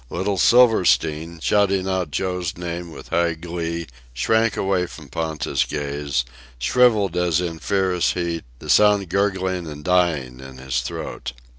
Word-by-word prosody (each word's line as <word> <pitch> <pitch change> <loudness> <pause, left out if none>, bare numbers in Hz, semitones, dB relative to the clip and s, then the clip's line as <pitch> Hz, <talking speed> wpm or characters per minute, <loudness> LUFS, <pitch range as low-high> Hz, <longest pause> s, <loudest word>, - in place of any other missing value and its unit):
Little 95 +2 -2
Silverstein, 85 -9 +3
shouting 100 -2 +2
out 95 -4 -1
Joe's 90 +2 -2
name 85 0 -5
with - - -11
high 85 -1 +1
glee, 85 0 -4 0.3
shrank 110 - +2
away 95 -2 0
from 75 -5 -12
Ponta's 80 +1 -1
gaze, 70 -3 -2 0.3
shrivelled 105 - +3
as 90 -2 +2
in 85 -2 -3
fierce 95 -2 +1
heat, 85 -2 -3
the - - -11
sound 105 -3 +4
gurgling 95 -2 0
and 75 -1 -8
dying 80 -9 +1
in 65 0 -11
his 65 -1 -2
throat. 60 -1 -6
85 Hz, 140 wpm, -22 LUFS, 80-95 Hz, 0.3 s, sound